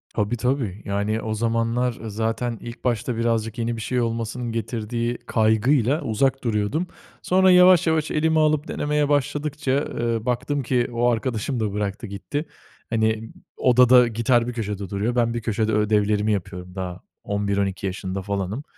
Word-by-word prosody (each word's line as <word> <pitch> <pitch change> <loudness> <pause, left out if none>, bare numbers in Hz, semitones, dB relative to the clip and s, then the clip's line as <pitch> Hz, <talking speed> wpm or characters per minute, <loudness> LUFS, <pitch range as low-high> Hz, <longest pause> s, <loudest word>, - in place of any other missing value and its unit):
Tabii 105 +3 0
tabii. 125 -6 -1
Yani 105 +2 -1
o 110 - -3
zamanlar 115 +2 0
zaten 115 +2 -2
ilk 120 0 -9
başta 120 0 0
birazcık 115 0 0
yeni 115 0 -1
bir - - -6
şey 125 +2 -1
olmasının 115 +1 -3
getirdiği 115 +1 -2
kaygıyla 120 +6 +2
uzak 135 +2 0
duruyordum. 115 - 0 0.3
Sonra 185 0 +4
yavaş 180 -1 +6
yavaş 160 -1 +1
elime 160 +1 +2
alıp 155 0 +2
denemeye 150 0 0
başladıkça, 145 0 -1
ııı, 115 -5 -1
baktım 130 +3 -1
ki 120 0 +1
o 120 +1 +2
arkadaşım 120 +1 -1
da 105 -2 -1
bıraktı, 105 +2 -3
gitti. 145 +10 -4 0.4
Hani, 110 0 0 0.3
odada 125 -1 +6
gitar 115 +1 +1
bir 125 - -3
köşede 105 -4 -4
duruyor. 105 +5 -1
Ben 115 -1 +2
bir 120 - -3
köşede 110 0 0
ödevlerimi 105 0 +2
yapıyorum 90 -1 -5
daha 90 -1 -5 0.2
11-12 100 -1 -1
yaşında 95 0 -4
falanım 100 +6 -3
115 Hz, 150 wpm, -23 LUFS, 105-125 Hz, 0.4 s, yavaş